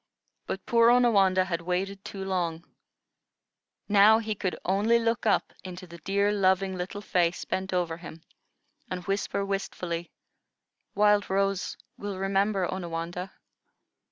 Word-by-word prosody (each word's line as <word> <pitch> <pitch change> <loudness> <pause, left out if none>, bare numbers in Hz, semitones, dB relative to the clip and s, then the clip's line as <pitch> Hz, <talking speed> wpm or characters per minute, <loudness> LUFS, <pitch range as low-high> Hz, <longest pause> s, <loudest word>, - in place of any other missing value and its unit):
But 190 - -4
poor 230 0 +5
Onawandah 200 -7 +4
had 170 -2 -2
waited 190 +3 -2
too 195 -1 -6
long; 175 -3 -2 1.2
now 210 +1 +6
he 220 -1 -2
could 190 -3 -3
only 205 +5 +3
look 230 -1 0
up 210 - +1
into 185 0 -8
the 170 -1 -12
dear, 200 +4 +1
loving, 190 -1 +2
little 185 +3 -5
face 175 -3 0
bent 190 0 -3
over 175 -3 -1
him, 165 -2 -11 0.7
and 180 -1 -5
whisper 200 0 -1
wistfully: 180 -3 -3 0.9
"Wild 205 0 +3
Rose 195 0 0 0.2
will 200 -2 -4
remember 195 0 +1
Onawandah?" 175 +1 -4
190 Hz, 125 wpm, -27 LUFS, 180-205 Hz, 1.2 s, now